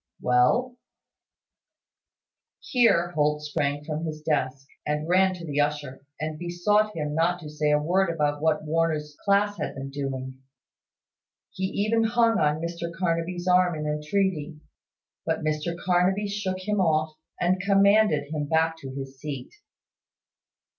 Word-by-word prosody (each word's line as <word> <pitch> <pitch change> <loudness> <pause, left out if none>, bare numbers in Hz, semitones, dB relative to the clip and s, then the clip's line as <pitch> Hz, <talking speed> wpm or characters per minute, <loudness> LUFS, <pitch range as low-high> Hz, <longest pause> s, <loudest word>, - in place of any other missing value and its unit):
"Well." 185 - +2 1.8
Here 200 - +2
Holt 150 -1 +1
sprang 145 -1 -1
from 155 +1 -4
his 155 -2 -5
desk, 135 -3 -1 0.2
and 150 +1 -2
ran 185 +1 +3
to 175 -2 -8
the 145 -2 -2
usher, 145 -2 -3 0.2
and 155 0 -4
besought 205 +5 +1
him 150 -2 -3
not 170 +3 +1
to 150 -2 -8
say 150 0 0
a 150 - +4
word 175 +5 +1
about 150 -3 0
what 155 -1 +1
Warner's 155 -1 -1
class 205 0 +2
had - - -3
been 135 0 -6
doing. 130 -2 -5 1.1
He 190 - -3
even 215 +4 +1
hung 230 -1 +3
on 150 +1 +1
Mr 170 0 -4
Carnaby's 175 +1 -2
arm 180 -1 +4
in 150 0 -4
entreaty; 155 +1 -1 0.6
but - - -2
Mr 155 +2 -1
Carnaby 185 +3 +1
shook 200 -2 -2
him 210 -1 +1
off, 155 -2 +1 0.3
and 180 +1 +1
commanded 200 -6 +3
him 150 -2 -2
back 160 +1 +1
to 135 -3 -8
his 135 -1 -7
seat. 140 -3 -6
160 Hz, 140 wpm, -26 LUFS, 150-185 Hz, 1.8 s, a